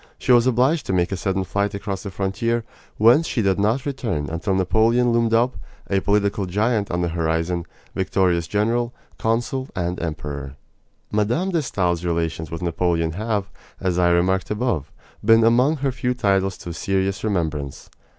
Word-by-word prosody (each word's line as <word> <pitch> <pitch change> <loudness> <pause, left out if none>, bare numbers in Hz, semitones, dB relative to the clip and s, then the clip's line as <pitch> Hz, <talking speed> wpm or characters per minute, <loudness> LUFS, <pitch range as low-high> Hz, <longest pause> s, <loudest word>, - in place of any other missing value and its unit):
She - - 0
was 120 0 +6
obliged 130 +6 +2
to - - 0
make 90 0 +1
a - - 0
sudden 95 +1 -1
flight 100 +2 -1
across 100 -1 -4
the 100 - -6
frontier, 100 +5 -1 0.3
whence 120 +10 +5
she 115 - -1
did 95 -1 +2
not 110 +6 +1
return 115 - -2
until 85 +4 -1
Napoleon 110 +6 +3
loomed 115 -1 +2
up, 115 -1 +2 0.3
a 100 - +3
political 100 -1 +1
giant 105 +2 0
on 90 0 -1
the 85 - 0
horizon 85 +1 -1 0.3
victorious 90 -3 +1
general, 115 +5 0 0.2
consul, 120 +4 -1
and 90 -1 -2
emperor. 70 -4 -5 0.6
Mme. 115 - +1
de 170 -3 +1
Stael's 90 - -1
relations 85 -1 -2
with 85 +1 -6
Napoleon 85 -1 0
have, 105 +2 -2 0.3
as 90 -2 0
I 90 -1 +4
remarked 90 +2 +2
above, 105 - -1 0.3
been 115 +1 +6
among 125 +7 +4
her 135 - +2
few 125 0 -2
titles 95 -5 +1
to 85 - -7
serious 95 +1 -1
remembrance. 80 -9 -2
100 Hz, 165 wpm, -22 LUFS, 85-115 Hz, 0.6 s, was